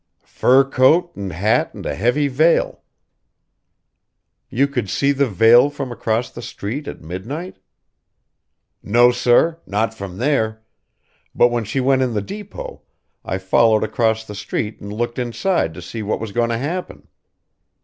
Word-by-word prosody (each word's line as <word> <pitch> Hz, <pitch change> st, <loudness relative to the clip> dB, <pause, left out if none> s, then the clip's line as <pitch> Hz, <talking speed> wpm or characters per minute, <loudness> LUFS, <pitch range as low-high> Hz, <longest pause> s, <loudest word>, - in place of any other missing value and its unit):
"Fur 130 Hz, +2 st, +4 dB
coat 135 Hz, +6 st, +3 dB
and 100 Hz, -2 st, -5 dB
hat 100 Hz, +7 st, 0 dB
and -, -, -9 dB
a -, -, -2 dB
heavy 125 Hz, -, +1 dB
veil." 155 Hz, +5 st, +2 dB, 1.7 s
"You 140 Hz, +3 st, +2 dB
could 125 Hz, -8 st, -3 dB
see 140 Hz, +7 st, +1 dB
the 140 Hz, 0 st, +1 dB
veil 115 Hz, +7 st, +6 dB
from 140 Hz, -3 st, -6 dB
across 115 Hz, 0 st, -2 dB
the 120 Hz, -, -9 dB
street 120 Hz, +6 st, -6 dB
at -, -, -7 dB
midnight?" 115 Hz, -, -6 dB, 1.2 s
"No 120 Hz, +4 st, +4 dB
sir. 125 Hz, +7 st, +2 dB
Not 110 Hz, +3 st, -1 dB
from 100 Hz, -4 st, -8 dB
there. 110 Hz, -4 st, 0 dB, 0.7 s
But 120 Hz, -, +5 dB
when 120 Hz, -2 st, -2 dB
she 115 Hz, +6 st, -2 dB
went 130 Hz, 0 st, +2 dB
in 125 Hz, -3 st, 0 dB
the 105 Hz, -, 0 dB
depot, 205 Hz, -, -8 dB, 0.4 s
I 95 Hz, -, -3 dB
followed 110 Hz, +3 st, +3 dB
across 110 Hz, 0 st, 0 dB
the 105 Hz, -, -8 dB
street 105 Hz, +1 st, -4 dB
and 100 Hz, -, -7 dB
looked 120 Hz, +3 st, -3 dB
inside 125 Hz, -, 0 dB
to 90 Hz, -, -9 dB
see 110 Hz, +6 st, -6 dB
what 105 Hz, 0 st, -2 dB
was 110 Hz, -2 st, -5 dB
goin' 115 Hz, +2 st, 0 dB
to 115 Hz, -, -1 dB
happen." 165 Hz, +9 st, -5 dB
120 Hz, 155 wpm, -20 LUFS, 110-135 Hz, 1.7 s, veil